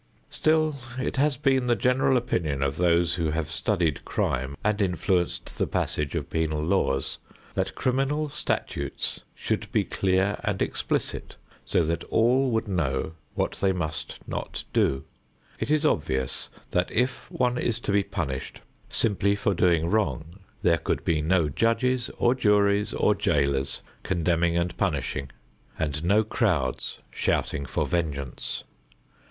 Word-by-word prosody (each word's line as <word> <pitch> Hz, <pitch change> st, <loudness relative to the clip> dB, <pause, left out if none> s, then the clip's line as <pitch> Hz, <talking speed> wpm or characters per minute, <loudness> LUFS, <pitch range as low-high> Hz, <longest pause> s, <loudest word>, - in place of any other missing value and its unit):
Still 155 Hz, -1 st, +2 dB, 0.2 s
it 130 Hz, -, -2 dB
has 140 Hz, -1 st, +2 dB
been 135 Hz, -2 st, +2 dB
the 120 Hz, -, +4 dB
general 125 Hz, +1 st, +3 dB
opinion 80 Hz, -, -1 dB
of 70 Hz, +2 st, -1 dB
those 85 Hz, -1 st, +3 dB
who 85 Hz, -3 st, 0 dB
have 80 Hz, 0 st, -2 dB
studied 80 Hz, -4 st, 0 dB
crime 65 Hz, +3 st, -1 dB
and 105 Hz, 0 st, +1 dB
influenced 90 Hz, -1 st, 0 dB
the -, -, +2 dB
passage 75 Hz, -2 st, -1 dB
of -, -, -2 dB
penal 80 Hz, -2 st, 0 dB
laws, 75 Hz, -6 st, +1 dB, 0.3 s
that 95 Hz, 0 st, -1 dB
criminal 135 Hz, +4 st, +1 dB
statutes 150 Hz, -, -2 dB
should -, -, -2 dB
be -, -, +3 dB
clear 95 Hz, +1 st, +1 dB
and -, -, -1 dB
explicit -, -, -2 dB, 0.3 s
so -, -, +2 dB
that 85 Hz, +1 st, -1 dB
all 125 Hz, +4 st, +3 dB
would 110 Hz, -2 st, 0 dB
know 80 Hz, -6 st, -1 dB, 0.2 s
what -, -, -1 dB
they 95 Hz, -, +4 dB
must 80 Hz, -3 st, -3 dB
not -, -, -4 dB
do. 65 Hz, 0 st, +2 dB, 0.6 s
It -, -, -2 dB
is 155 Hz, +1 st, +3 dB
obvious 65 Hz, -, 0 dB, 0.2 s
that 90 Hz, 0 st, +1 dB
if 125 Hz, +2 st, 0 dB
one 125 Hz, -1 st, 0 dB
is 115 Hz, -1 st, 0 dB
to -, -, -1 dB
be 100 Hz, 0 st, +4 dB
punished 85 Hz, -10 st, -4 dB, 0.3 s
simply 100 Hz, -2 st, +2 dB
for 100 Hz, 0 st, +1 dB
doing 85 Hz, -2 st, +3 dB
wrong, 90 Hz, -3 st, -1 dB, 0.2 s
there 85 Hz, -1 st, +4 dB
could -, -, -2 dB
be 80 Hz, -2 st, +2 dB
no 85 Hz, 0 st, +3 dB
judges 115 Hz, -, +1 dB
or 120 Hz, -, +4 dB
juries 105 Hz, -3 st, +3 dB
or 105 Hz, -, +3 dB
jailers 70 Hz, -7 st, +1 dB, 0.2 s
condemning 85 Hz, -1 st, +1 dB
and 85 Hz, 0 st, 0 dB
punishing 70 Hz, -6 st, -1 dB, 0.5 s
and 75 Hz, 0 st, -2 dB
no 100 Hz, +5 st, +4 dB
crowds 90 Hz, -, 0 dB
shouting 70 Hz, 0 st, -1 dB
for -, -, 0 dB
vengeance. 75 Hz, -7 st, -2 dB
90 Hz, 145 wpm, -26 LUFS, 80-115 Hz, 0.6 s, the